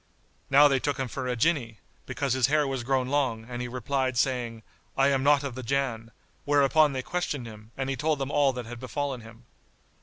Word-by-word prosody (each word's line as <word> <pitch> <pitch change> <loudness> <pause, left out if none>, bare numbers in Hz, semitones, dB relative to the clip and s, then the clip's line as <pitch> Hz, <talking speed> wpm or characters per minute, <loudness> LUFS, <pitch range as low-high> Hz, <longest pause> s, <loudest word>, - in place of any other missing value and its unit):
Now 145 +2 +7
they 135 -2 +2
took 145 0 -1
him 135 - -2
for 130 +2 -5
a 125 - -1
Jinni, 120 -4 0 0.3
because 140 -3 -1
his 130 -1 +3
hair 150 +1 +2
was 135 -3 -3
grown 130 0 0
long; 130 -6 0
and 120 0 -5
he 125 - -3
replied, 130 +1 -2
saying, 120 -4 -1 0.3
"I 135 +1 +4
am 135 -1 +1
not 145 +1 +4
of 140 -3 -4
the 130 - -6
Jann," 125 -3 -2 0.3
whereupon 145 +1 +4
they 130 -1 -3
questioned 150 -7 -3
him, 110 -1 -11
and 135 -1 -2
he 135 - -1
told 150 +3 0
them 135 0 -3
all 145 -2 +3
that 125 -2 -6
had 120 +1 -8
befallen 135 0 -3
him. 115 +2 -14
130 Hz, 215 wpm, -27 LUFS, 120-140 Hz, 0.3 s, Now